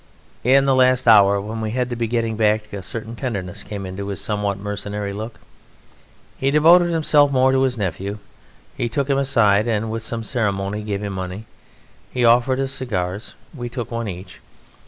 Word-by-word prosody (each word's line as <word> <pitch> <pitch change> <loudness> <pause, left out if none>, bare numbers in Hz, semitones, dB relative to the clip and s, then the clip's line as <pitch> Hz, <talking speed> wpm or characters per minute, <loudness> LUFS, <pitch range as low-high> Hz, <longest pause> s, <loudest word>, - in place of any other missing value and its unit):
In 135 +3 +5
the 135 - +3
last 130 -1 +3
hour 100 -3 +6
when 110 +3 -5
we 110 - -2
had 125 0 -1
to - - -2
be 115 -1 -1
getting 115 -1 -1
back 105 -1 +1
a 100 - -4
certain 115 +4 -7
tenderness 100 -9 -4
came 100 -2 -6
into 95 +2 -6
his 100 -2 -4
somewhat 105 -2 -1
mercenary 105 0 -4
look. 110 +3 -7 1.0
He 135 - +1
devoted 170 +4 +5
himself 150 -3 +3
more 130 0 +4
to 130 0 +2
his 130 -2 +1
nephew; 100 0 -3 0.6
he 120 - -2
took 140 +3 -1
him 135 - +2
aside, 115 -6 +3
and, 110 -1 -1
with 115 0 -3
some 115 +1 -4
ceremony, 105 -4 -2
gave 105 -1 -4
him 100 -1 -4
money. 95 +3 -5 0.7
He 125 -1 +1
offered 125 +3 +4
us 135 0 -1
cigars. 100 -7 -4 0.2
We 120 -5 -6
took 120 -1 -6
one 115 -1 -3
each. 90 -1 -8
110 Hz, 185 wpm, -21 LUFS, 100-130 Hz, 1.0 s, hour